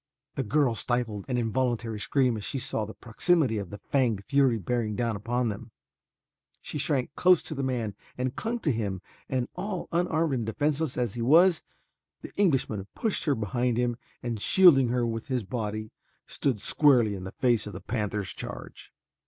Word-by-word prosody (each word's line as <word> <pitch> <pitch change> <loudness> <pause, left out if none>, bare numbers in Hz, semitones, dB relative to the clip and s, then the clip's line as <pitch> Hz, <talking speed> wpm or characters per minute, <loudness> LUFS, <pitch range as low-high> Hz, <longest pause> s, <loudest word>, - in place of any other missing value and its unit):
The - - -2
girl 130 +1 +2
stifled 115 -2 -2
an 125 - 0
involuntary 115 -1 -1
scream 130 +1 +1
as 105 - -5
she 135 - -3
saw 115 -4 -2
the 110 - -9
proximity 125 0 +1
of 100 -3 -6
the 105 - -7
fanged 115 -3 0
fury 135 -4 +3
bearing 110 +1 -1
down 115 -1 0
upon 120 +3 -1
them. 100 - -6 0.9
She 150 - -6
shrank 140 -2 0
close 180 -2 +4
to - - -5
the 140 - -3
man 120 -6 -1 0.2
and 125 0 -2
clung 230 +2 -2
to 150 - +1
him 100 -5 -3 0.3
and 130 -2 0
all 200 -3 -4
unarmed 165 -3 +1
and 120 -4 -1
defenseless 145 +4 -1
as 120 -5 0
he 120 - -4
was, 165 +8 +5 0.6
the - - -9
Englishman 130 - +1
pushed 220 -3 -1
her 145 -3 +2
behind 120 +3 -1
him 120 -1 +1 0.3
and 115 -4 -3
shielding 160 - +6
her 120 0 +1
with 115 -1 -3
his 130 -4 -1
body, 110 0 -4 0.3
stood 130 -7 -1
squarely 125 -3 +4
in 95 -2 -6
the 95 - -6
face 120 -4 +1
of 105 - -7
the - - -6
panther's 105 -4 -2
charge. - - -8
120 Hz, 180 wpm, -28 LUFS, 110-140 Hz, 0.9 s, shielding